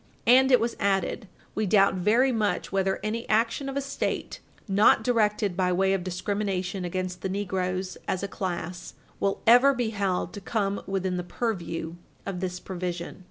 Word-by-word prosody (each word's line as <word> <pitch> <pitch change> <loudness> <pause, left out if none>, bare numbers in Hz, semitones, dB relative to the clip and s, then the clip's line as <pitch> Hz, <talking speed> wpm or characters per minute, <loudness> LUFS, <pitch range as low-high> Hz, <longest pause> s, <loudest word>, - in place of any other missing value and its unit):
And 260 +3 +6
it 250 - +7
was 230 +1 -1
added, 195 +2 0 0.3
"We 215 -1 -1
doubt 200 0 +5
very 220 +8 +3
much 215 -4 -1
whether 195 0 0
any 225 +2 -3
action 230 +5 +1
of 275 - -4
a - - +1
State 275 0 -3 0.3
not 205 +2 +4
directed 210 -5 +1
by 180 -1 +1
way 190 +2 +2
of 190 -2 -1
discrimination 190 0 -2
against 180 0 -3
the 190 - -2
negroes 185 -1 -2
as 190 0 -1
a - - -1
class 180 -2 -5 0.2
will 195 0 0
ever 245 +4 +7
be 235 -3 -1
held 195 -4 -1
to 205 - -7
come 200 -1 -1
within 190 -1 -1
the 180 - -2
purview 175 -5 -3 0.3
of 190 -2 -4
this 180 -1 -3
provision." 175 -2 -5
195 Hz, 170 wpm, -27 LUFS, 185-220 Hz, 0.3 s, it